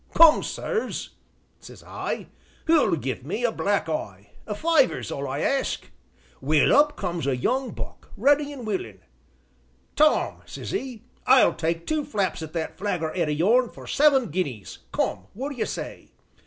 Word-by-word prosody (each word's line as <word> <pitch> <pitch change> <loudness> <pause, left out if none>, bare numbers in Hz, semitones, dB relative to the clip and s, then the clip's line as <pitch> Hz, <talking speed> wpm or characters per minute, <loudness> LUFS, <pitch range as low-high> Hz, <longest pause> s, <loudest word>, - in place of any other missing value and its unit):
Come, 330 -2 +8
sirs,' 455 -2 -3 0.5
says - - -13
I, - - -4 0.4
'who'll 320 - +4
give 130 -6 -4
me 205 - -3
a 240 - +3
black 205 -5 0
eye; 100 - -5 0.2
a 210 - -3
fiver's 310 +2 +2
all 140 0 -3
I 135 +3 -3
ask.' 275 -1 -1 0.5
Well, 150 +2 +3
up 295 +1 +4
comes 175 -6 -3
a 130 -2 +1
young 255 - 0
buck, - - -9
ready 290 +5 +3
an' 265 -5 -8
willin'. 360 - -4 0.9
'Tom,' 305 +1 +3
says - - -7
'e, 260 - -4 0.2
'I'll 260 -1 +6
take 165 +1 -2
two 310 -1 0
flaps 200 -9 -1
at 160 -1 -7
that 165 +1 -4
figger 175 -6 -2
head 170 -4 0
o' - - +1
yourn 220 +11 +3
for - - -12
seven 275 - +3
guineas, 140 - -3
come, 95 - -1
what 265 +6 -3
d'ye 240 - -1
say?' - - -6
210 Hz, 160 wpm, -25 LUFS, -, 0.9 s, Come